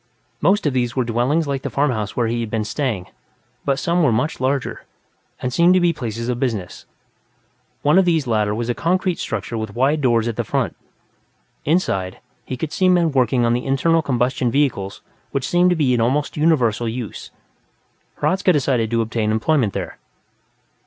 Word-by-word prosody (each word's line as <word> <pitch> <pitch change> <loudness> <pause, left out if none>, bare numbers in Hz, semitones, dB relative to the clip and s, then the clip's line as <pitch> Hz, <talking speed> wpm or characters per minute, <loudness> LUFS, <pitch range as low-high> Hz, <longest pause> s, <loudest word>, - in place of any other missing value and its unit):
Most 205 -1 +3
of 145 - +1
these 125 -1 -1
were 130 - +1
dwellings 125 +7 0
like 140 -1 -2
the - - -4
farmhouse 125 -8 -1
where 120 - +2
he 115 +1 -1
had 115 -2 -3
been 110 0 -1
staying, 105 -4 -2 0.6
but 140 -1 0
some 175 +3 +1
were 145 -7 +4
much 125 +6 -1
larger, 135 +1 -1 0.5
and 125 0 -3
seemed 175 +4 +5
to - - +5
be 175 -1 +2
places 115 -5 -4
of 125 -1 -2
business. 110 -9 -3 1.0
One 150 +6 +5
of 190 - +3
these 165 -5 +2
latter 105 -3 +1
was 115 +1 -3
a 120 - +1
concrete 180 +4 0
structure 115 - -3
with 110 -2 -5
wide 140 +5 +2
doors 120 -3 +2
at 115 - -3
the - - 0
front; - - -1 0.9
inside, 95 - 0 0.3
he 130 - -5
could 155 +3 -4
see 185 -1 +3
men 175 -3 +3
working 125 -2 +2
on 115 - +2
the 125 +2 -2
internal 165 +5 +2
combustion 125 -2 0
vehicles 115 -8 -1 0.3
which 140 -1 -2
seemed 175 +1 +3
to 180 - +2
be 140 -6 +2
in 120 - +1
almost 140 +6 0
universal 125 -8 +2
use. 115 -1 -6 0.9
Hradzka 185 0 +2
decided 130 -7 +1
to 115 0 +1
obtain 110 -1 -1
employment 110 - +1
here. - - -5
130 Hz, 185 wpm, -20 LUFS, 115-155 Hz, 1.0 s, seemed